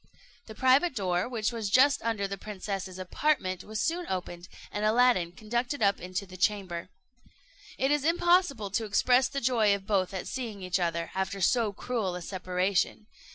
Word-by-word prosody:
The 220 - -9
private 260 +6 +3
door, 185 0 0
which 230 -2 -1
was 225 -4 -3
just 270 +6 +5
under 220 -3 -1
the 200 - -4
princess's 195 -2 -5
apartment, 185 -1 -1
was 215 0 -5
soon 335 +10 -1
opened, 175 -1 -4 0.2
and 205 - -3
Aladdin 215 -5 +3
conducted 240 +7 -2
up 200 -1 +2
into 185 +2 -4
the 185 -1 -12
chamber. 185 -3 -1 0.9
It 270 +1 +1
is 295 -2 +2
impossible 335 - +2
to 220 +3 -1
express 250 +4 +3
the 280 - -3
joy 225 -4 +3
of 195 -1 -8
both 195 -3 +1
at 190 -2 -5
seeing 225 -7 -5
each 180 +1 0
other, 170 -1 -1
after 190 +1 -2
so 220 +3 +2
cruel 200 -3 -3
a 180 - -6
separation. 185 +3 -1
205 Hz, 170 wpm, -29 LUFS, 185-245 Hz, 0.9 s, just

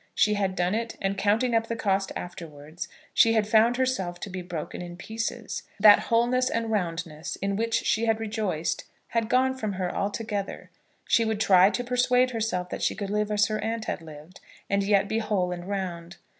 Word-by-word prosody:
She 210 -1 +3
had 195 -2 0
done 180 +1 0
it, 230 +1 -3
and, 195 0 -1
counting 220 +5 +1
up 225 0 +2
the 230 - -2
cost 195 -3 0
afterwards, 160 -3 -7 0.3
she 225 - +5
had 215 -2 +2
found 225 +3 +4
herself 195 -10 -1
to 200 - -6
be 185 0 -4
broken 175 -3 -6
in 175 0 -8
pieces. 225 +4 -4 0.2
That 205 0 +8
wholeness 245 +2 +3
and 230 -1 -1
roundness, 165 -4 -3
in 195 0 -2
which 230 +2 0
she 225 +1 +1
had 225 -1 +2
rejoiced, 210 -7 -2 0.2
had 230 -1 -1
gone 260 +1 +3
from 215 -6 -3
her 185 -1 -3
altogether. 205 0 -3 0.4
She 230 - +4
would 220 -2 -1
try 190 -2 +6
to 245 - -2
persuade 250 +1 +2
herself 215 -6 -2
that - - -4
she - - +1
could 200 0 -4
live 210 0 0
as 210 0 +3
her 215 -1 -2
aunt 225 0 -2
had - - -3
lived, 155 +2 -12 0.3
and 200 0 +3
yet 200 0 +2
be 220 - 0
whole 205 -5 0
and 175 +1 -6
round. 175 -3 -4
205 Hz, 200 wpm, -26 LUFS, 180-225 Hz, 0.4 s, That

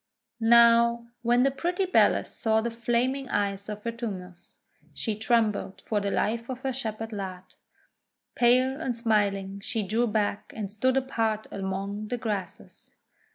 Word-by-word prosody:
Now, 235 0 +5 0.2
when 240 +1 +3
the 275 - +3
pretty 350 +7 -1
Bellis 370 - +3
saw 220 -1 +2
the 235 +1 -2
flaming 240 +3 -1
eyes 200 0 -1
of 210 0 -6
Vertumnus, 200 -7 -6 0.4
she 220 -3 -2
trembled 220 -3 0
for 215 - 0
the 200 - -1
life 230 +4 -1
of 255 -1 -5
her 265 0 -2
Shepherd 225 -3 -4
lad. 190 -3 -5 0.9
Pale 255 +4 +3
and 250 -6 -2
smiling 200 -4 0
she 215 +2 -2
drew 225 +5 +1
back, 210 -1 -1
and 205 -3 -4
stood 255 +5 +1
apart 225 -5 0
among 200 +2 -4
the 245 - -2
grasses. 210 -5 -6
225 Hz, 145 wpm, -27 LUFS, 205-240 Hz, 0.9 s, Now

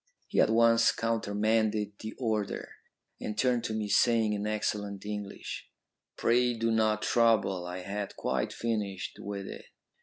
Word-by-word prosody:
He - - 0
at - - +4
once 115 +1 +5
countermanded 110 -1 0
the 110 0 -6
order, 110 -5 -2 0.5
and 105 0 -4
turned 125 -1 +2
to 110 - -2
me, 110 -1 -2
saying 110 +1 +3
in 105 0 -2
excellent 105 -2 -2
English, 105 -1 -6 0.5
'Pray 120 +1 +3
do 115 0 0
not 110 -1 +2
trouble. 110 -6 +2
I 90 +1 -5
had 100 +2 -4
quite - - -1
finished 105 -5 -3
with 100 -1 -5
it.' - - -8
110 Hz, 145 wpm, -30 LUFS, 105-115 Hz, 0.5 s, once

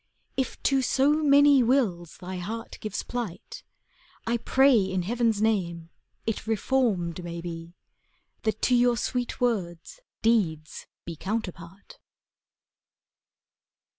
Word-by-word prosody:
If 265 - -2
to 270 -1 +3
so 270 +2 +2
many 285 -2 +6
wills 225 - 0
thy 185 +1 -6
heart 225 +6 -6
gives 215 - -4
plight, 235 -8 -6 0.6
I 235 +1 +1
pray 265 +3 +4
in 190 -4 +1
Heaven's 225 +1 0
name, 170 -6 -1 0.3
it 225 0 -3
reformed 210 -7 0
may 170 0 -6
be. 170 0 -7 0.7
That 220 -2 -2
to 250 - +4
your 245 0 +3
sweet 245 +1 -2
words 195 - -2 0.2
deeds 170 -10 0 0.2
be 170 - -6
counterpart. 190 -1 -6
220 Hz, 110 wpm, -26 LUFS, 175-245 Hz, 0.7 s, many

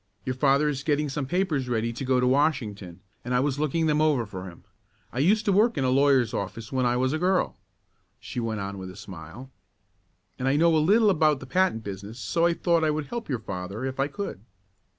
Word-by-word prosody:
Your 130 - -1
father 140 +3 +3
is 140 -2 -1
getting 150 0 0
some 135 0 -3
papers 155 -7 0
ready 115 0 -1
to 120 - -5
go 130 -1 +2
to 125 - +2
Washington, 120 - 0 0.2
and 125 +1 -2
I - - +4
was 140 +1 0
looking 155 +2 0
them 150 -1 +2
over 145 -7 +2
for 95 -3 -8
him. 90 -2 -11 0.5
I 120 - -3
used 210 +9 +3
to 205 - +3
work 215 +5 +3
in 135 - +1
a 130 - +2
lawyer's 135 -4 +3
office 110 +3 -5
when 130 -2 +1
I 120 0 +1
was 130 +2 +1
a 155 - -1
girl," 185 +2 +1 0.6
she - - -6
went 110 -3 -2
on 100 0 -5
with 95 0 -7
a 95 - -11
smile, 95 - -10 0.9
"and 130 - -1
I 135 - +3
know 165 +2 +4
a - - +4
little 205 +7 +4
about 155 -5 +2
the 130 - -9
patent 160 -6 +1
business 100 +3 -7
so 165 - +1
I 170 - +2
thought 170 -2 +1
I 155 - +3
would 150 0 -1
help 235 -6 -5
your 130 - 0
father 100 +2 -5
if 135 0 -5
I 135 - +2
could." 170 - -6
135 Hz, 230 wpm, -26 LUFS, 115-155 Hz, 0.9 s, I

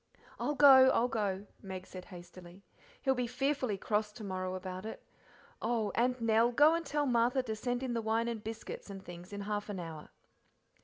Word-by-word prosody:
"I'll 295 - -1
go, 270 -2 +8
I'll 240 - +3
go," 205 -4 -2 0.2
Meg 190 -1 -7
said 185 -1 -9
hastily, 175 0 -12 0.4
"he'll 265 - +3
be 250 -2 -1
fearfully 255 -3 -1
cross 210 +1 -1
to 220 - -9
morrow 185 -1 -3
about 185 0 -6
it. 220 - -7 0.6
Oh! 225 -3 0
and, 250 +1 +1
Nell, 230 +1 +3
go 295 +6 +6
and 335 0 0
tell 295 -2 -1
Martha 250 +1 +2
to 220 -3 -3
send 245 +3 -2
in 255 -2 -2
the 230 - -1
wine 225 +1 0
and 230 -3 -4
biscuits 220 -1 -7
and 195 -1 -8
things 175 +1 -10
in 205 0 -5
half 205 +1 -3
an 200 -3 -4
hour." 160 -3 -8
220 Hz, 195 wpm, -33 LUFS, 190-250 Hz, 0.6 s, go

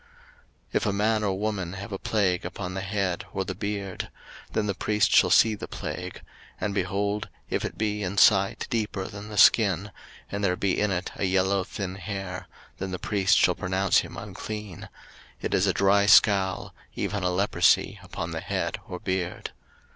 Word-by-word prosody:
03:013:029 480 - -28 0.7
If - - -1
a 105 - +1
man 105 +2 +1
or 95 -2 -1
woman 100 -4 -2
have 100 +3 -7
a 95 - -4
plague 95 -5 +1
upon 90 - -5
the 95 - -3
head 95 -2 -1
or 95 -1 -1
the 95 - -3
beard; 100 -1 -4 0.4
03:013:030 - - -25
Then 110 - +1
the 100 - 0
priest 105 +3 +1
shall - - +6
see 110 0 +5
the 105 - -6
plague: - - -6 0.4
and, 105 - -2
behold, 100 +2 -1 0.2
if - - 0
it - - -4
be 105 -1 -1
in 100 +1 -3
sight 100 -1 +4
deeper 105 -5 -1
than 100 +1 -9
the 105 - -7
skin; 100 -2 +5 0.4
and 100 0 -3
there 90 -2 +2
be 95 +1 0
in 105 - +2
it 90 -1 -2
a - - 0
yellow 95 +1 +2
thin 95 0 -5
hair; 95 -3 -5 0.3
then 95 - -3
the 90 - -3
priest 100 +2 +2
shall 90 - +4
pronounce 95 +1 +2
him - - -6
unclean: 105 -4 -7 0.5
it - - -3
is 95 - +3
a - - +4
dry 100 +3 +3
scall, 95 -3 +4 0.2
even 105 -1 -2
a 90 - +1
leprosy 95 +3 +2
upon - - -5
the - - -4
head - - -2
or 90 - -6
beard. 90 -1 -3
100 Hz, 190 wpm, -26 LUFS, 95-105 Hz, 0.7 s, shall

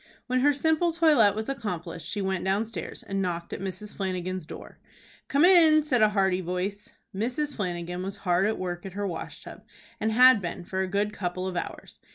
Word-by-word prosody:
When 255 0 0
her 290 +3 +4
simple 320 +4 +1
toilet 300 - +4
was 220 0 -3
accomplished 180 - -5
she 205 +1 -3
went 190 -2 -1
downstairs, 200 -1 -3
and 195 0 -3
knocked 170 -2 -3
at - - -5
Mrs. 195 +2 -6
Flanagan's 185 -3 -3
door. - - -10 0.5
"Come 285 +4 +4
in!" 325 -4 +7
said 255 -6 +1
a 215 - +6
hearty 190 -3 +1
voice. 190 +4 -4 0.2
Mrs. 255 +8 -2
Flanagan 180 -2 -3
was 195 +1 -5
hard 180 +2 +3
at 220 - -1
work 175 -1 -4
at 190 - -8
her 205 +1 -3
wash 170 -4 -6
tub, - - -11 0.4
and 220 +1 0
had 250 -1 +7
been 175 0 -5
for 190 +2 -4
a 190 - -1
good 205 +2 -1
couple 185 0 -3
of 185 -1 -4
hours. - - -6
195 Hz, 200 wpm, -27 LUFS, 180-235 Hz, 0.5 s, in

